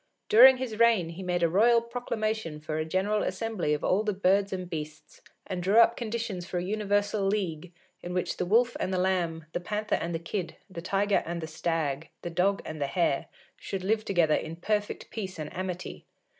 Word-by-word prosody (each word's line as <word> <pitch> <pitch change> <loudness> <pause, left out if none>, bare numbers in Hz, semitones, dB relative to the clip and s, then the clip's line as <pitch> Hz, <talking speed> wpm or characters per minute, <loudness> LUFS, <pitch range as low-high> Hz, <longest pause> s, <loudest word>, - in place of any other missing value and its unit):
During 255 +4 +9
his 240 -4 -5
reign 230 -8 +4
he 170 +3 -8
made 180 -1 -1
a - - +5
royal 225 +8 +5
proclamation 220 -7 -3
for 155 +1 -4
a 155 - -1
general 195 +5 0
assembly 190 -4 -2
of 150 - -7
all 195 - +2
the 215 -1 -1
birds 195 +1 +2
and 185 -1 -4
beasts, 155 -2 -7 0.2
and 185 -2 -4
drew 195 +5 +2
up 230 0 +7
conditions 225 -5 -3
for 180 0 -4
a 175 - -1
universal 205 +1 0
league, 180 -5 -1 0.3
in 175 - -6
which 180 0 -2
the 180 - -1
Wolf 235 +5 +3
and 185 - -1
the 185 - 0
Lamb, 175 -4 0
the - - -1
Panther 210 +4 -3
and 170 0 -1
the - - +1
Kid, 170 +1 -4
the 185 -4 -8
Tiger 200 +3 +1
and 170 0 -3
the 160 - -4
Stag, 160 -2 -2
the 175 - -4
Dog 190 +4 +1
and 155 -1 -6
the 140 - +1
Hare, 165 0 0 0.3
should 190 -2 -5
live 215 +3 +1
together 170 -7 +2
in 160 +1 -2
perfect 205 +4 -2
peace 190 -5 -5
and 155 -1 -6
amity. 185 -1 -5
185 Hz, 205 wpm, -28 LUFS, 170-215 Hz, 0.3 s, During